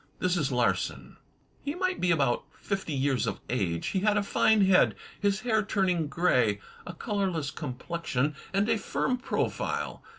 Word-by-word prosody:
This 180 0 +1
is 150 -6 0
Larsan: 125 -2 -1 0.5
He 285 +2 -3
might 370 0 -1
be 180 - +2
about 140 -7 +2
fifty 195 -5 -3
years 135 -1 +1
of - - -2
age. 85 -9 -1
He 190 - 0
had 210 +1 +2
a 205 - +2
fine 210 0 +4
head, 190 -1 +5 0.2
his 200 0 +1
hair 220 -2 +2
turning 185 -6 +1
grey; 125 - +2 0.3
a 180 - -5
colourless 185 -8 -1
complexion, 150 0 -2 0.2
and 200 +2 +1
a 225 -1 +2
firm 255 +4 -1
profile. 250 - -2
180 Hz, 160 wpm, -28 LUFS, 140-205 Hz, 0.5 s, head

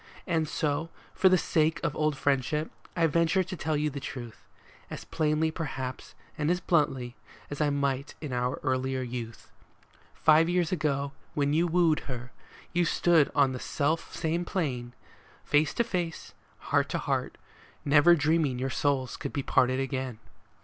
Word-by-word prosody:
And 165 -3 0
so, 150 +2 -1 0.2
for 190 - +4
the 185 - +5
sake 160 -1 +1
of 160 -3 -1
old 155 -2 0
friendship, 145 +3 0 0.2
I 165 - +3
venture 170 +4 +2
to 185 +1 -6
tell 155 -2 -1
you 150 0 0
the 140 - -5
truth, 120 -4 -8 0.4
As - - -7
plainly, 155 0 +1
perhaps, 135 -6 -5 0.2
and 150 0 +1
as 180 +1 +2
bluntly, 135 -8 0 0.4
as 145 - -3
I 150 - +3
might 140 -1 -1
in 150 -5 -5
our 125 +1 -1
earlier 130 -1 0
youth. 120 -2 -7 0.6
Five 160 +1 +5
summers 175 0 +1
ago, 140 -5 0 0.2
when 145 0 +1
you 170 +3 +3
wooed 170 -2 +3
her, 125 0 -6 0.4
you 175 0 +3
stood 165 -2 +3
on 140 -2 +4
the 130 - -5
self 155 +5 -1
same 165 +1 -1
plane, 130 -10 -3 0.5
Face 145 0 +3
to 235 - +3
face, 175 -7 -4 0.4
heart - - +3
to - - -1
heart, - - -2 0.5
never 145 +4 +6
dreaming 150 -3 +1
your 130 +1 -2
souls 135 -3 0
could - - -5
be 140 - -2
parted 130 0 +2
again. 130 -3 -3
150 Hz, 165 wpm, -28 LUFS, 130-165 Hz, 0.6 s, never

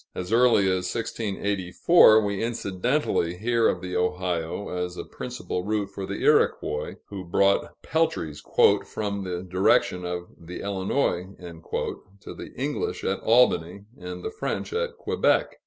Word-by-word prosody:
As 90 +4 -4
early 120 -3 +5
as 95 -1 0
1684, 105 - +3
we 100 -1 -2
incidentally 115 - -1
hear 115 +2 +2
of 90 - 0
the 90 -1 -5
Ohio 90 0 -1
as 90 0 -4
a - - -4
principal 125 -7 -5
route 105 0 -1
for 95 -1 -6
the - - -4
Iroquois, 75 0 +2
who 100 -2 -6
brought 100 +3 +1
peltries 160 - -1 0.4
"from 100 -2 -4
the 90 -1 -4
direction 90 0 +2
of 90 0 -4
the 85 +1 -8
Illinois" 95 -1 -1 0.9
to - - -8
the - - -9
English 135 -9 -3
at 95 - -1
Albany, 100 -5 +2
and 90 -2 -8
the - - -3
French 140 - -4
at 470 +1 -2
Quebec. - - +1
95 Hz, 140 wpm, -25 LUFS, 90-115 Hz, 0.9 s, early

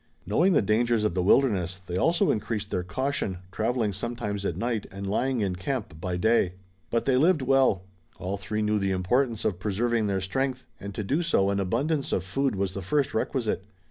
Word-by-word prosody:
Knowing 175 - +3
the 145 - +4
dangers 110 +2 +2
of 105 - +1
the 90 - 0
wilderness, 95 -4 +3
they 90 - -4
also 170 - +3
increased 105 -1 -2
their 90 - 0
caution, 120 0 -2
traveling 110 0 0
sometimes 105 -1 -3
at - - -2
night 115 -2 -1
and 100 +1 -7
lying 120 +5 0
in 95 -3 0
camp 95 - -4
by 90 -1 -2
day. 110 -2 +3 0.4
But 115 - 0
they 130 -2 +3
lived 160 +1 +4
well. 130 -8 +3 0.3
All 95 +3 -3
three 105 +2 -2
knew 105 0 +2
the 100 -1 0
importance 110 +6 +1
of 90 -4 0
preserving 110 +3 0
their 100 -1 0
strength, 130 +7 -2
and 100 -1 -7
to 105 - -2
do 140 - 0
so 100 - +2
an 100 - 0
abundance 140 - 0
of 90 - 0
food 130 +6 0
was 95 -1 -1
the 100 - -4
first 140 +9 0
requisite. 110 -3 -1
105 Hz, 200 wpm, -27 LUFS, 95-130 Hz, 0.4 s, the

